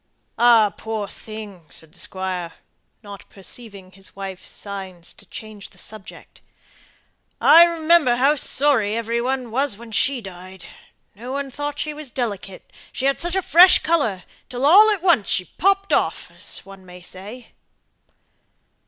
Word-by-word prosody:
"Ah, 230 -4 +5
poor 220 -2 -4
thing," 205 -5 -10
said 160 -1 -13
the - - -13
squire, 185 -3 -5 0.5
not 200 -1 -11
perceiving 195 -1 -8
his 195 +1 -8
wife's 195 -2 -7
signs 190 -4 -8
to - - -15
change 215 -2 -9
the - - -21
subject, 215 -3 -11 1.0
"I 335 +1 +8
remember 330 -6 +3
how 270 +4 +4
sorry 260 -7 +2
every 230 +1 -1
one 255 -1 -2
was 265 -2 -1
when 235 0 -12
she 260 +5 +1
died; 185 -2 -11 0.5
no 240 +6 -9
one 280 -1 -4
thought 290 +2 -5
she 305 +1 -3
was 300 -2 -8
delicate, 205 -6 -5 0.2
she 265 - -4
had 275 0 +1
such 345 +1 -2
a 380 - 0
fresh 355 +4 +7
colour, 230 - 0 0.3
till 250 +2 -2
all 405 +8 +8
at 405 -5 0
once 335 - +3
she 185 -4 0
popped 395 - 0
off, - - 0
as - - -6
one 195 -1 -13
may 180 0 -13
say." 210 +7 -9
225 Hz, 155 wpm, -21 LUFS, 195-285 Hz, 1.0 s, I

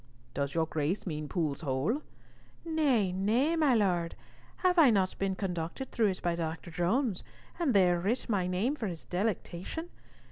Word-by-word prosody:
"Does 140 +1 -2
your 165 -1 +2
grace 160 +4 -1
mean 150 -4 -4
Pool's 155 -4 -1
Hole?" 150 - 0 0.6
"Nay, 280 - +2
nay, 225 - +2
my 300 -6 +4
Lord. 180 -6 +1 0.5
Have 360 -1 +5
I 300 -5 +8
not 195 -4 +2
been 195 -1 0
conducted 180 +6 -4
through 225 -3 +2
it 190 -2 -3
by 175 - +1
Dr. 165 +1 -4
Jones, 190 - 0 0.4
and 290 -10 +1
there 180 -3 +5
writ 210 +8 -1
my 195 -6 +1
name 195 +10 0
for 230 -7 -3
his 170 -4 -6
delectation? 195 - -3
190 Hz, 165 wpm, -31 LUFS, 170-240 Hz, 0.6 s, I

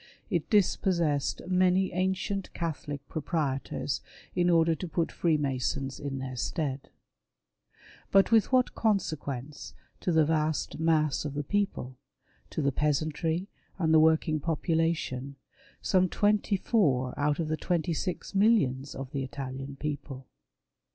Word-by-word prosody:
It 170 -5 0
dispossessed 170 -7 +2
many 185 +1 +3
ancient 190 +2 -1
Catholic 145 -4 -4
proprietors, 145 -4 -2 0.3
in 175 0 +3
order 165 -1 +4
to 180 +3 -5
put 165 0 -1
Freemasons 135 -4 0
in 140 -1 -4
their 130 -1 -5
stead. 140 +1 -3 1.2
But 195 0 +6
Avith 225 -2 +5
what 255 -1 +2
consequence 150 - -2 0.2
to 180 - -1
the 160 -2 +4
vast 155 0 0
mass 155 -3 +2
of 145 -1 -5
the 145 - -1
people, 145 -8 -2 0.5
to 155 - -2
the 140 - +2
peasantry 155 +5 0 0.3
and 160 -3 +2
the 160 - +7
working 160 0 +3
popu 165 +2 -1
lation 140 -5 -1 0.2
— - - -28
some 185 -1 +3
twenty 205 +1 +2
four 135 - +1
out 145 0 +1
of 165 - -1
the 155 - 0
twenty 170 0 -1
six 180 +5 -4
millions 195 - +2
of 135 -1 -6
the 140 - -2
Italian 135 +1 -6
people 140 -2 -5
155 Hz, 135 wpm, -29 LUFS, 140-180 Hz, 1.2 s, the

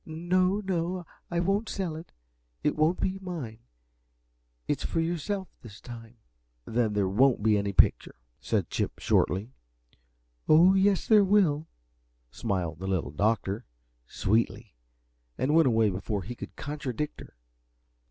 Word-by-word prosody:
"No 180 +5 0
no, 180 -2 -2 0.2
I 175 - -1
won't 195 +5 0
sell 180 -5 -3
it, 160 +2 -9 0.6
for - - +2
it 150 - +1
won't 155 +3 +2
be 190 0 -1
mine. 160 - -6 1.1
It's - - -1
for - - -1
yourself 175 +4 -2
this 105 -4 -12
time." 115 -1 -11 0.5
"Then 115 -2 0
there 100 -2 +1
won't 120 +3 +3
be 110 -1 +4
any 100 -1 0
picture," - - +3 0.2
said - - -1
Chip, - - -2
shortly. 100 +7 +1 1.0
"Oh, 170 +5 +7
yes, 195 0 +2
there 215 -2 +6
will," 180 -6 +2 0.6
smiled 90 - -3
the 95 - -5
Little 90 -9 -1
Doctor, 105 - 0 0.4
sweetly, 110 - -1 0.6
and 140 +3 0
went 160 -2 +5
away 110 -3 +3
before 100 +1 -3
he 115 +7 -6
could 120 - -9
contradict 145 -1 -4
her. - - -13
145 Hz, 140 wpm, -28 LUFS, 110-180 Hz, 1.1 s, Oh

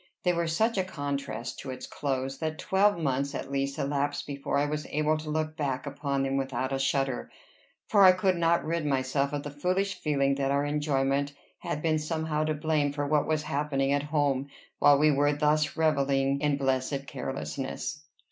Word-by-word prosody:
They 180 - +3
were 170 -1 0
such 210 +6 +1
a - - +2
contrast 140 -8 -4
to 135 - -7
its 130 0 -6
close, 135 -1 -3
that 155 -1 -2
twelve 200 +2 +2
months 140 -2 -1
at 135 - -5
least 140 0 -1
elapsed 145 +1 -1
before 140 0 -2
I 145 - +2
was 150 0 -3
able 155 +1 +1
to 155 0 -7
look 155 0 -1
back 135 -3 -2
upon 140 -1 -2
them 135 0 0
without 135 0 -2
a 135 - 0
shudder; 135 -1 0 0.6
for 205 -2 +5
I 185 - +10
could 185 0 +1
not 170 0 +2
rid 165 +1 -1
myself 140 0 0
of 145 -1 -3
the 145 - -6
foolish 185 +7 0
feeling 140 -6 +1
that 135 - +1
our 140 +1 +1
enjoyment 140 -1 0 0.3
had 150 - -4
been 155 -1 +2
somehow 155 0 -1
to 155 0 0
blame 150 -1 +1
for 145 0 -2
what 150 0 +2
was 155 -1 0
happening 140 -2 0
at 145 - +2
home 140 -3 +1 0.3
while 145 -1 +6
we 150 +1 +4
were 145 +1 +3
thus 150 +1 +1
revelling 140 -3 +2
in 145 -2 +2
blessed 135 0 -1
carelessness. 135 +2 -4
145 Hz, 190 wpm, -28 LUFS, 140-155 Hz, 0.6 s, I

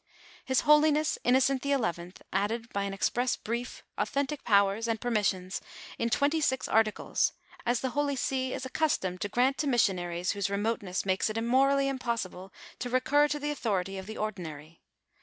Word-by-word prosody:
His 260 -1 +1
holiness 300 0 +4
Innocent 260 +1 +3
XI., 220 -12 -1 0.2
added 225 +5 -1
by 200 0 -1
an 200 - -3
express 245 +5 +1
brief, 235 +3 -5 0.2
authentic 280 +1 -1
powers, 200 +1 +3
and 225 -1 -1
permissions 200 -6 -1 0.4
in 230 - +1
twenty 285 +6 +2
six 260 -3 0
articles, 220 -1 +1 0.3
as 240 0 +2
the 260 - -1
holy 290 0 0
see 260 0 -1
is 260 - -4
ac 260 - -7
customed 190 - 0
to 205 - -2
grant 255 +5 +2
to 300 - 0
missionaries 180 -8 +1
whose 200 -1 -1
remoteness 200 -2 -1
makes 190 +2 +1
it 215 +1 -2
morally 275 +3 +3
impossible 230 -8 -3 0.3
to 245 - -3
recur 280 +4 +3
to 295 - -2
the 295 0 -2
authority 195 -8 -2
of 190 - -9
the 220 - -6
ordinaiy. 165 -7 -6
235 Hz, 165 wpm, -29 LUFS, 195-270 Hz, 0.4 s, holiness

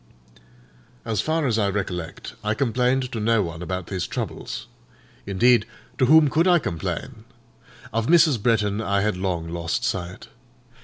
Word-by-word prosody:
As 110 -2 0
far 160 +4 0
as 115 -4 +1
I 100 -2 +2
recollect, 90 -4 -4
I 105 +1 0
complained 125 +1 +1
to 115 - -3
no 110 0 +2
one 85 -1 -6
about 90 0 -4
these 90 0 -3
troubles. - - -5 0.6
Indeed, 120 +5 +3 0.3
to 130 - +4
whom 155 +2 +7
could 160 +6 +2
I 180 -1 +6
complain? 95 - -4 0.7
Of 115 0 0
Mrs. 155 -7 +5
Bretton 105 -2 +1
I 100 -2 +1
had 105 -1 0
long 90 -3 -2
lost 85 0 -2
sight. 90 -1 -4
105 Hz, 150 wpm, -23 LUFS, 90-125 Hz, 0.7 s, whom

